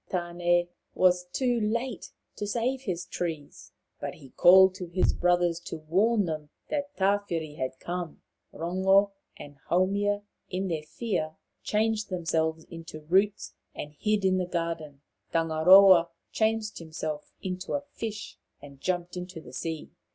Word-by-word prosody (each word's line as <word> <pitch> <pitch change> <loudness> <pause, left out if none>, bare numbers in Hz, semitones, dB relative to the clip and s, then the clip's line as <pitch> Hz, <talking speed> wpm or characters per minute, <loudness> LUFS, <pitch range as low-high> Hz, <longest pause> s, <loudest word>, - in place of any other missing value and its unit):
Tane 175 -1 +1 0.3
was 180 -1 +3
too 240 +6 0
late 235 +3 -2 0.2
to 205 - -4
save 245 +5 -1
his 185 -8 -3
trees, 160 -5 -5 0.3
but - - -5
he 135 - -15
called 190 +1 +7
to 185 -2 -7
his 180 +2 +1
brothers 175 -1 +2
to 185 - -5
warn 195 +8 +2
them 155 -3 -4 0.2
that 285 -1 -3
Tawhiri 190 -6 0
had 130 0 -3
come. 175 -2 -5 0.3
Rongo 190 +4 +2 0.3
and 145 -1 -11
Haumia, 200 +3 +1 0.3
in 190 +1 -2
their 160 -3 -1
fear, 155 -2 -3 0.3
changed 215 0 0
themselves 160 -3 -1
into 165 -2 -10
roots 195 +6 +1 0.2
and 150 0 -7
hid 210 +5 0
in 185 0 +3
the 180 - -1
garden. 165 -5 -4 0.3
Tangaroa 170 +2 +6 0.2
changed 220 -1 0
himself 155 -2 -5
into 185 0 -4
a 285 - -1
fish 225 -7 -7 0.2
and 140 -1 -14
jumped 175 -1 -2
into 180 -1 -6
the - - -13
sea. 160 -2 -5
180 Hz, 140 wpm, -28 LUFS, 165-205 Hz, 0.3 s, called